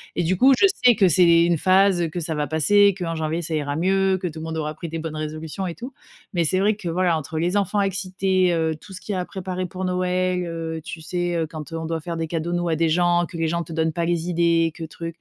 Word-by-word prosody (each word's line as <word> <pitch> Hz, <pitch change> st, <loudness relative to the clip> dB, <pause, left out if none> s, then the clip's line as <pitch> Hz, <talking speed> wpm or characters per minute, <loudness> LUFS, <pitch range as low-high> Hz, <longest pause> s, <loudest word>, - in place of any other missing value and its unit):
et -, -, 0 dB
du 180 Hz, +2 st, +1 dB
coup, 265 Hz, +4 st, +6 dB
je 395 Hz, -, +6 dB, 0.2 s
sais 245 Hz, -1 st, +8 dB
que 190 Hz, -, +4 dB
c'est 170 Hz, 0 st, +5 dB
une 170 Hz, -1 st, +2 dB
phase, 190 Hz, +2 st, +4 dB
heu, -, -, 0 dB
que 175 Hz, -, -4 dB
ça 160 Hz, -1 st, -3 dB
va 150 Hz, -1 st, -1 dB
passer, 200 Hz, +7 st, +4 dB
qu'en 165 Hz, -3 st, -3 dB
janvier 160 Hz, +1 st, -2 dB
ça 160 Hz, -1 st, -3 dB
ira 145 Hz, -2 st, -2 dB
mieux, 190 Hz, +3 st, +2 dB
que 185 Hz, -, -1 dB
tout 160 Hz, -1 st, -7 dB
monde 160 Hz, 0 st, -5 dB
aura 155 Hz, 0 st, -3 dB
pris 170 Hz, +2 st, -6 dB
des 165 Hz, +1 st, -5 dB
bonnes 160 Hz, -1 st, -5 dB
résolutions 155 Hz, +4 st, -5 dB
et 170 Hz, -, -4 dB
tout. 250 Hz, +3 st, -8 dB, 0.4 s
Mais 175 Hz, -2 st, +1 dB
c'est 185 Hz, +4 st, +1 dB
vrai 210 Hz, +2 st, +2 dB
que 200 Hz, -4 st, -8 dB
voilà 175 Hz, -1 st, +1 dB
entre 155 Hz, +1 st, -5 dB
les 175 Hz, +5 st, +1 dB
enfants 200 Hz, +1 st, +1 dB
excités, 190 Hz, 0 st, -1 dB, 0.2 s
heu, 160 Hz, -1 st, 0 dB
tout -, -, -15 dB
ce 185 Hz, -, -7 dB
qu'il 210 Hz, -, -4 dB
y -, -, -1 dB
a -, -, -1 dB
à -, -, -4 dB
préparer 185 Hz, -1 st, -4 dB
pour 185 Hz, +1 st, -5 dB
Noël. 180 Hz, 0 st, 0 dB
Heu, 165 Hz, -1 st, -5 dB
tu 160 Hz, 0 st, -8 dB
sais, 175 Hz, +1 st, -2 dB
heu, 165 Hz, -1 st, 0 dB
quand, 155 Hz, +1 st, -8 dB
heu, 165 Hz, -, -4 dB
on 160 Hz, -, -5 dB
doit 160 Hz, -1 st, -3 dB
faire 170 Hz, 0 st, -5 dB
des 165 Hz, -, -2 dB
cadeaux 165 Hz, +1 st, -3 dB
nous 175 Hz, 0 st, -1 dB
à 160 Hz, -, +1 dB
des 165 Hz, +1 st, +1 dB
gens, 175 Hz, +1 st, +2 dB
que 170 Hz, -, -9 dB
les 165 Hz, -, 0 dB
gens 170 Hz, +1 st, -1 dB
te 165 Hz, -, -12 dB
donnent 160 Hz, -1 st, 0 dB
pas 170 Hz, -, -1 dB
les 170 Hz, 0 st, -1 dB
idées, 170 Hz, -1 st, +2 dB
que 165 Hz, -, -7 dB
truc. 165 Hz, +1 st, -7 dB
170 Hz, 290 wpm, -23 LUFS, 160-185 Hz, 0.4 s, sais